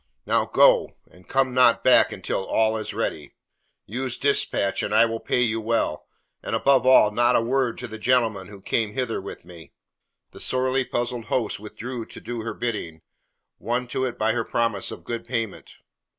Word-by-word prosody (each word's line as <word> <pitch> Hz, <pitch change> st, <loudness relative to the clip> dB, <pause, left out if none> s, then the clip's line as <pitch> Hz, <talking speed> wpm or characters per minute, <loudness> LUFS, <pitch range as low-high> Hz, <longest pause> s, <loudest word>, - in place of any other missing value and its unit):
"Now, -, -, +1 dB
go, -, -, +4 dB, 0.2 s
and 90 Hz, 0 st, -20 dB
come 135 Hz, -1 st, +1 dB
not 125 Hz, -2 st, +4 dB
back -, -, +5 dB
until 95 Hz, -, -3 dB
all 110 Hz, +3 st, +1 dB
is 110 Hz, -1 st, -4 dB
ready. 75 Hz, -2 st, -4 dB, 0.5 s
Use 125 Hz, +3 st, -3 dB
dispatch 140 Hz, -8 st, +1 dB
and 105 Hz, -, -2 dB
I 115 Hz, -, +6 dB
will 115 Hz, 0 st, -3 dB
pay 125 Hz, -, 0 dB
you 115 Hz, -1 st, -1 dB
well, 110 Hz, -8 st, -1 dB, 0.3 s
and -, -, -3 dB
above 135 Hz, -2 st, +3 dB
all, 130 Hz, -5 st, +6 dB
not 120 Hz, +3 st, +2 dB
a -, -, +5 dB
word 125 Hz, 0 st, 0 dB
to 125 Hz, -, -6 dB
the 110 Hz, -1 st, -9 dB
gentleman 110 Hz, -5 st, +1 dB
who 100 Hz, -1 st, -12 dB
came 105 Hz, +1 st, -1 dB
hither 125 Hz, -4 st, -2 dB
with -, -, -9 dB
me." 85 Hz, -4 st, -14 dB, 0.6 s
The -, -, -13 dB
sorely 130 Hz, 0 st, +1 dB
puzzled 120 Hz, -1 st, -3 dB
host 115 Hz, -6 st, -1 dB
withdrew 115 Hz, +3 st, -7 dB
to -, -, -11 dB
do 120 Hz, -1 st, -5 dB
her 115 Hz, -, -5 dB
bidding, 95 Hz, -9 st, -4 dB, 0.6 s
won 125 Hz, +2 st, -2 dB
to 130 Hz, -, -2 dB
it 125 Hz, -, -4 dB
by 110 Hz, +1 st, +1 dB
her 115 Hz, -1 st, -1 dB
promise 115 Hz, -3 st, -1 dB
of -, -, -9 dB
good 115 Hz, -1 st, -5 dB
payment. 115 Hz, -4 st, -5 dB
115 Hz, 185 wpm, -24 LUFS, 110-125 Hz, 0.6 s, I